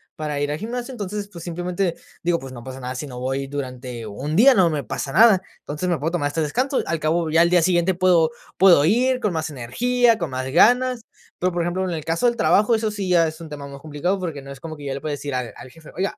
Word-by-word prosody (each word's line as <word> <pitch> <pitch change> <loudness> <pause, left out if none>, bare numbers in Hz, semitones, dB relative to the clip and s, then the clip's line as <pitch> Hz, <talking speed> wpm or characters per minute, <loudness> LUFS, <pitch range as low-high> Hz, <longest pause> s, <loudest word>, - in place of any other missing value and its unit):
para 150 -2 -3
ir 145 0 -1
al 150 - -2
gimnasio, 240 +6 -5
entonces, 205 -2 -5
pues, 170 -3 -9
simplemente, 175 +1 -2 0.3
digo, 170 -1 +1
pues, 135 -1 -9
no 120 - -9
pasa 130 +1 -8
nada, 125 0 -5
si 130 - -4
no 125 -3 -8
voy 135 +2 -2
durante 125 -4 -6
un 135 +10 -4
día 260 +6 +7
no 185 -4 +4
me 150 -2 -2
pasa 135 - -4
nada. 200 0 +6 0.2
Entonces, 150 +5 -5
me 170 -5 0
puedo 155 - -1
tomar 145 -5 0
este 160 +2 -2
descanso, 255 - 0
al 165 -1 -1
cabo 160 +1 0
ya 165 +2 +4
al 170 - +4
día 180 -1 +5
siguiente 175 +1 +2
puedo 175 -3 +3 0.3
puedo 180 -6 +6
ir 250 +7 +2
con 210 -6 -1
más 160 -1 -2
energía, 230 - +1
con 170 -5 -3
más 130 0 -3
ganas. 245 - +4 0.4
Pero, 185 +1 +1
por 175 - -1
ejemplo, 175 +2 -1
en 185 - -2
el 155 -3 -4
caso 165 +8 -1
del 240 -1 +3
trabajo, 205 +8 +3
eso 220 -1 +1
sí 205 -3 -4
ya 170 -2 +4
es 155 0 -7
un 160 - -9
tema 145 -1 -7
más 140 0 -10
complicado, 155 +6 -2
porque, 165 -6 -4
no 135 - -12
es 135 - -10
como 160 +2 -7
que 145 -1 -10
yo 135 - -2
le 135 - -6
pueda 155 - -3
decir 145 -2 -4
al 125 -3 -3
al - - -11
jefe: 160 +4 -15
"Oiga, 195 +2 -2
165 Hz, 265 wpm, -22 LUFS, 145-190 Hz, 0.4 s, día